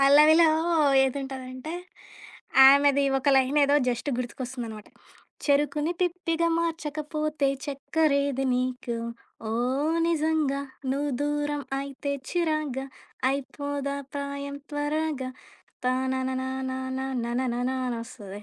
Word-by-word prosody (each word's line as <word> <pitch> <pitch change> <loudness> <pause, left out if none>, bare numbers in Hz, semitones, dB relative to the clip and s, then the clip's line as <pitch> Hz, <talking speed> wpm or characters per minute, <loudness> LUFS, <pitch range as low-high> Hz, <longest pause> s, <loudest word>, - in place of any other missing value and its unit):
పల్లవిలో 305 +4 +7 0.6
ఏదుంటదంటే. 265 +2 -4 0.9
ఆమెది 280 0 +5 0.2
ఒక 275 - 0
లైనేదో 280 +2 +4
జస్టు 245 +4 -1
గుర్తుకొస్తుందనమాట. 245 -3 -5 0.6
చెరుకుని 295 +3 +2
పిప్పిగ 340 -2 0 0.2
మార్చకపోతే 305 -3 -1 0.2
చక్కరేది 280 -1 +1
నీకు. 250 -1 -2 0.5
ఓ - - -1 0.6
నిజంగా 310 -3 +1 0.3
నువ్వు 285 +1 -1
దూరం 295 0 -1 0.2
అయితెే 280 +1 -4 0.2
చిరాగ్గా 310 -6 -1 0.4
అయపోద 280 +1 -3 0.3
ప్రాయం 280 0 -4 0.2
త్వరాగ 295 0 -1 0.7
తానన 260 0 0
నాన్న 260 0 -3 0.3
న - - -2 0.2
నన 235 +1 -1 0.2
నన 245 +1 -1 0.2
అనొస్తది. 230 -4 -6
280 Hz, 90 wpm, -27 LUFS, 260-300 Hz, 0.9 s, పల్లవిలో